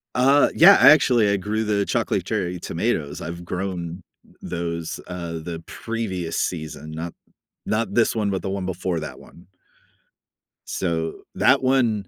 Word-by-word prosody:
Uh, 135 +3 +5
yeah. 195 +5 +9
Actually, 125 -8 +6
I 100 - +2
grew 105 +3 -2
the 105 -2 0
chocolate - - -1
cherry 90 -5 -2
tomatoes. 80 -6 -2
I've 85 +1 -6
grown 90 -1 -4 0.4
those, 85 -1 -4
uh, 85 -2 -5
the 85 +1 -6
previous 95 -8 -4
season, 80 -2 -3
not 80 +2 -5 0.5
not 115 +2 -1
this 120 -1 +2
one, 105 -3 0
but 95 - -2
the 95 - -4
one 95 -1 -3
before 90 -2 -2
that 75 - -7
one. 85 - -17 1.2
So, 80 -3 -2
that - - +4
one 120 -7 +2
95 Hz, 145 wpm, -23 LUFS, 85-110 Hz, 1.2 s, yeah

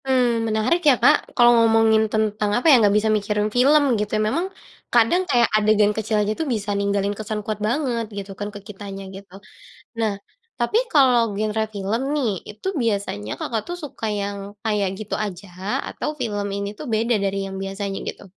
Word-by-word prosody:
Mmm, 240 -4 +2
menarik 220 +11 +1
ya 260 - +5
Kak - - +5 0.2
kalau 240 0 +7
ngomongin 225 -1 +4
tentang 215 -1 0
apa 245 - -3
ya, 245 - +6
nggak 205 -1 +4
bisa 215 +1 +1
mikirin 210 0 -1
film 280 +2 +4
gitu 210 - -2
ya - - +1
memang 345 +10 -1 0.4
kadang 240 +10 +4
kayak 240 -1 +4
adegan 210 -1 +3
kecil 220 0 -1
aja 210 0 +1
tuh 320 - -1
bisa 210 -4 -1
ninggalin 200 0 0
kesan 215 +1 -4
kuat 215 -1 -3
banget 240 -2 -1
gitu 200 0 -6
kan 205 0 -3
ke 205 0 -9
kitanya 195 -1 -8
gitu. 195 -1 -12 0.7
Nah 220 -2 +1 0.4
tapi 240 - 0 0.2
kalau 245 -7 +4
genre 215 +2 -1
film 200 +4 -1
nih 280 -6 +1 0.2
itu 210 - -8
biasanya 200 - -2
Kakak 225 -2 -2
tuh 350 - -4
suka 270 -5 -6
yang 200 0 -3 0.2
kayak 210 -3 0
gitu 215 - -4
aja 200 -2 -5 0.4
atau - - -4
film 205 -4 -2
ini 200 0 -3
tuh - - -7
beda 230 +2 +2
dari 195 -1 -1
yang 190 - -6
biasanya 195 0 -4
gitu? - - -6
215 Hz, 185 wpm, -22 LUFS, 205-235 Hz, 0.7 s, kalau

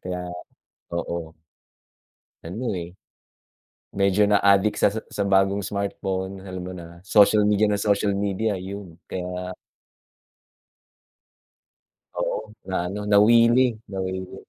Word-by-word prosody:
Kaya, 90 -1 -4 0.7
oo. 85 -1 -4 1.1
Ano, 110 +9 -5
eh, 85 +1 -7 1.0
medyo 100 +1 +3
na-addict 100 0 +4
sa - - +6
sa 110 +2 -5
sa 100 - -4
bagong 100 0 +2
smartphone 95 -1 -3
alam 95 -1 -6
mo 90 - -6
na 85 -1 -10
social 105 +1 +5
media 105 0 +3
nang 105 - +1
social 100 0 +1
media 100 +1 -1
'yun 95 -2 -8
kaya 90 0 -5 2.6
Oo - - -1 0.3
na 95 - -1
ano 100 +3 -4
nawili, 115 +4 +6 0.2
nawili. 95 -1 -4
100 Hz, 110 wpm, -24 LUFS, 95-105 Hz, 2.6 s, sa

